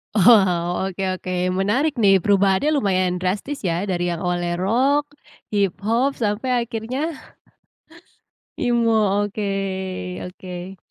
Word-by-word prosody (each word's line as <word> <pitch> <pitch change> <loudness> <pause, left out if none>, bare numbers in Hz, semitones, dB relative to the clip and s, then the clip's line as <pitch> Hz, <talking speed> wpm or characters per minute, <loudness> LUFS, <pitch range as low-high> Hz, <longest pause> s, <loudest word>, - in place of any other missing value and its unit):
Wow, 185 -3 +4
oke, 195 +1 -5
oke 185 0 -6 0.3
menarik 260 +10 +1
nih, 195 -2 +5
perubahannya 200 +6 +3
lumayan 185 -6 +1
drastis 205 +10 -2
ya 170 +3 -1
dari 175 -1 -1
yang 170 -1 -3
awalnya 175 -1 -1
rock, 270 +7 +2 0.5
hip 200 -4 +1
hop, 240 +6 +1
sampai 210 +5 -1
akhirnya 230 +3 -5 1.6
Emo, 225 -4 +2
oke 195 -3 -3
oke. 180 +1 -8
195 Hz, 110 wpm, -22 LUFS, 185-225 Hz, 1.6 s, nih